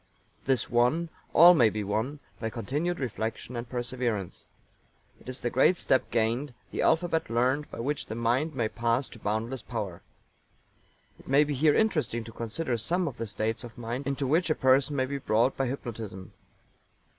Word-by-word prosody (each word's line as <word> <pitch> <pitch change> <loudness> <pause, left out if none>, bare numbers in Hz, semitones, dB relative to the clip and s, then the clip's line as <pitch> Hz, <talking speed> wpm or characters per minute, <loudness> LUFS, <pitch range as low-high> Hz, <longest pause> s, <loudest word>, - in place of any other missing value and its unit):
This 135 -2 +2
won, 125 +8 +2 0.2
all 175 +3 +9
may 120 -10 +5
be 105 0 -3
won, 110 +9 -2 0.2
by 110 - -2
continued 145 +10 -2
reflection 115 -1 -4
and 120 0 -5
perseverance. 120 -6 -3 0.7
It - - -11
is 130 - -4
the 120 - -1
great 155 +8 +4
step 130 - +1
gained, 120 +4 0 0.2
the - - -2
alphabet 165 0 +2
learned, 130 +5 +1
by - - -6
which 145 +4 -2
the 110 - -5
mind 125 +7 0
may 115 -4 +1
pass 115 +4 0
to 115 - -12
boundless 110 +5 -2
power. 105 -8 -5 1.2
It - - -17
may 140 +3 +5
be 150 0 -2
here 145 +2 +3
interesting 155 - +1
to 115 - -10
consider 120 +4 -3
some 175 - 0
of - - -5
the 115 - -4
states 110 +3 -2
of 120 -2 -10
mind 120 +4 -4
into 140 0 -1
which 165 +6 +2
a 155 - +3
person 135 +2 +3
may 130 -1 +1
be 140 +1 -4
brought 120 0 +2
by 135 - 0
hypnotism. 110 -7 -6
125 Hz, 180 wpm, -28 LUFS, 115-145 Hz, 1.2 s, all